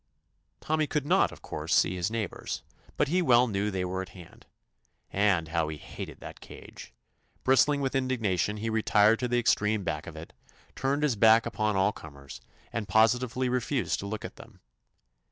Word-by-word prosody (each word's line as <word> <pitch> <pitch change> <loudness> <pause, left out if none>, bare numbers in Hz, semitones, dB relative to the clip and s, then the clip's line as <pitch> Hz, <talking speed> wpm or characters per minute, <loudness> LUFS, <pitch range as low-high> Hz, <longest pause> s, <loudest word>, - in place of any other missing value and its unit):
Tommy 155 -1 0
could 150 -2 -2
not, - - +3
of - - -14
course, - - -2
see 90 - +3
his 90 +1 -1
neighbors, 110 -4 -4 0.3
but 150 - +2
he 180 +5 +1
well 125 -6 +5
knew 105 -3 -1
they 95 -2 -2
were 95 +1 -3
at 95 - -8
hand. 85 -2 -15 0.7
And 95 -5 +2
how 80 -1 0
he 75 0 -5
hated - - -9
that - - -10
cage - - -12
I - - -41 0.5
Bristling 135 +3 +3
with 135 -1 -1
indigna 125 -8 0
tion, 105 +4 0
he 110 +2 -3
retired 110 0 +3
to 125 - -1
the 120 0 0
extreme 110 -3 +1
back 75 -4 -4
of 80 - -8
it, 80 +1 -10 0.4
turned 140 +2 -1
his 140 -6 +2
back 110 +1 +5
upon 105 -1 -1
all 95 +2 +3
comers, 70 -8 -12 0.3
and 115 -3 -3
positively 125 +3 +2
refused 125 +1 -1
to 100 - -5
look 110 +1 -5
at - - -9
them. - - -15
110 Hz, 190 wpm, -28 LUFS, 95-125 Hz, 0.7 s, well